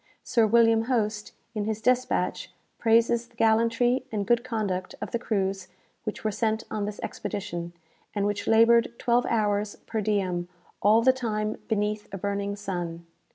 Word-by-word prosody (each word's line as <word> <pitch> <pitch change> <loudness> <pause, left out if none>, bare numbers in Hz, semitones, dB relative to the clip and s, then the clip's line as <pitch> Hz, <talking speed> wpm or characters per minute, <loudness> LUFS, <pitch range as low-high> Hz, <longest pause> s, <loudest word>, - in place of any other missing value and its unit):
"Sir 230 -3 +3
William 225 0 +4
Hoste, 215 -4 -1 0.2
in 210 -2 -2
his 220 0 -2
despatch, 255 +2 0 0.3
praises 230 +1 +3
the 240 - -28
gallantry 230 +3 +2
and 205 -2 -1
good 235 +2 +2
conduct 210 -7 -3
of - - -5
the 235 - -1
crews 195 -4 -1 0.4
which 215 - -4
were 215 - 0
sent 220 +1 0
on 210 -1 -1
this 210 0 -5
expedition, 180 -4 -4 0.4
and 200 -1 +1
which 205 0 -2
laboured 230 +1 +5
twelve 240 0 +2
hours 210 -2 0
per 220 -1 -2
diem, 190 -4 0 0.3
all 215 +3 +5
the 260 +1 +6
time 215 -4 -2
beneath 210 -1 -1
a 195 - -4
burning 200 +1 -2
sun. 175 -4 -5
215 Hz, 155 wpm, -27 LUFS, 205-230 Hz, 0.4 s, the